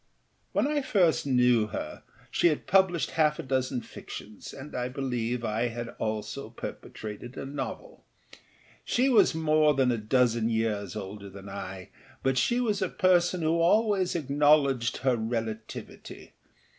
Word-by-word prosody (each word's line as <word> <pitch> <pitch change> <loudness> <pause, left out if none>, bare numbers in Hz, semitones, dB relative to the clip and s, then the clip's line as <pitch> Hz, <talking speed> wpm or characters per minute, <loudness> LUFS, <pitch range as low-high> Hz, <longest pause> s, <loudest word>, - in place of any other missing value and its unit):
When 295 +1 +1
first 190 - +2
I - - -2
knew 125 -4 +4
her - - -6 0.3
she - - +3
had 155 -3 0
published 190 -4 +3
half 150 -1 +2
a - - -5
dozen 130 -1 -1
fictions, 105 -2 -9
and 140 +3 -9
I 125 0 -2
believe 125 -3 -2
I 110 +2 0
had 120 0 -5
also 110 -1 -3
perpetrated 110 +4 -8
a - - -5
novel. 145 - -6 0.8
She 255 +3 +2
was 230 -9 +5
more 155 -2 +3
than 130 -2 +3
a 115 - -1
dozen 115 0 +2
years 110 -4 -1
older 100 -1 -7
than 100 +1 -11
I, 95 -1 -7 0.3
but 135 -1 +2
she 240 - +2
was 215 -5 0
a 190 - 0
person 180 -1 +2
who 160 +2 +2
always 195 0 +3
acknowledged 140 -4 +3
her 130 -2 +4
relativity. 110 -1 -5
130 Hz, 145 wpm, -28 LUFS, 115-165 Hz, 0.8 s, was